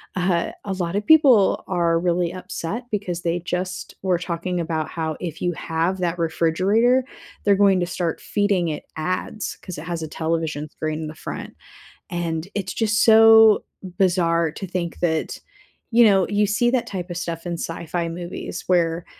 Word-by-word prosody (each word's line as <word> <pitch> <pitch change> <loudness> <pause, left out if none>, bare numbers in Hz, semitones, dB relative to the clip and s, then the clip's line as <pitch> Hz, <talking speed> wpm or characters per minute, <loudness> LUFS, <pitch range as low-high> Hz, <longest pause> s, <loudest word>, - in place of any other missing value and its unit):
uh, 180 -2 0
a 195 - -2
lot 180 0 -3
of 205 0 -1
people 270 -11 +5
are 170 -2 +1
really 175 0 0
upset 185 +5 -5
because 180 -4 -3
they 170 +1 -1
just 180 +1 -4
were 185 -2 +1
talking 175 0 -3
about 160 -2 -2
how 160 -2 -3
if 170 -4 -6
you 175 - +1
have 165 +4 -2
that 175 -1 -1
refrigerator, 190 +10 +2 0.4
they're 200 -1 +4
going 195 -2 +4
to 175 - 0
start 175 -1 -3
feeding 200 -4 0
it 150 - -4
ads, 185 +5 -3
'cause 185 - -8
it 150 - -7
has 170 -1 -4
a 160 - -4
television 160 -1 -2
screen 155 0 -4
in - - -4
the 155 - -8
front, - - -7 0.6
and 170 -1 -2
it's 190 -3 -3
just 220 0 +1
so 225 -1 +7 0.4
bizarre 170 -3 +2
to 195 - -7
think 175 -2 -3
that, 160 -2 -1 0.5
you 235 +1 +6
know, 195 -3 +4
you 205 0 +2
see 210 +4 +2
that 250 -2 0
type 180 -2 -5
of 175 - -4
stuff 170 -1 -5
in 175 - -3
sci-fi 170 0 -3
movies, 175 +1 -6
where 170 -2 +1
175 Hz, 175 wpm, -22 LUFS, 165-195 Hz, 0.6 s, so